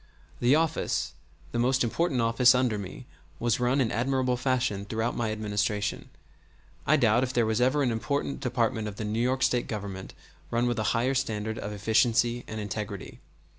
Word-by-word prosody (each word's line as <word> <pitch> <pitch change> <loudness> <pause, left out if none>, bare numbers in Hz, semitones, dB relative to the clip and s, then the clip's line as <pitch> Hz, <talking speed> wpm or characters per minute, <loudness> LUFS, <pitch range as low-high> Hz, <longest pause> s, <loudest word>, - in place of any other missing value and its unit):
The 125 +4 +4
office, 160 0 0 0.4
the 120 - -2
most 130 +2 +2
important 130 +2 0
office 120 +3 +5
under 125 -4 +1
me, 95 -2 -8 0.3
was 120 0 0
run 125 +3 +2
in 120 -4 +1
admirable 130 +1 +1
fashion 125 -5 0
throughout 110 +3 -2
my 115 -2 -1
Administration; 105 -1 -2 0.8
I 155 - +5
doubt 120 -2 +4
if 130 0 -1
there 120 - +3
ever - - 0 0.3
was - - +2
an 125 - +1
important 140 +5 -2
department 115 -3 0
of 105 - -6
the 110 - -4
New 105 +2 -2
York 130 +1 +1
State 125 -1 +1
Government 100 -3 -6 0.3
run 120 +1 +1
with 120 -2 0
a - - 0
higher 125 +3 +1
standard 110 -4 -2
of 105 - -5
efficiency 115 +3 +2
and 110 - -5
integrity. 105 -1 -5
120 Hz, 175 wpm, -28 LUFS, 110-125 Hz, 0.8 s, office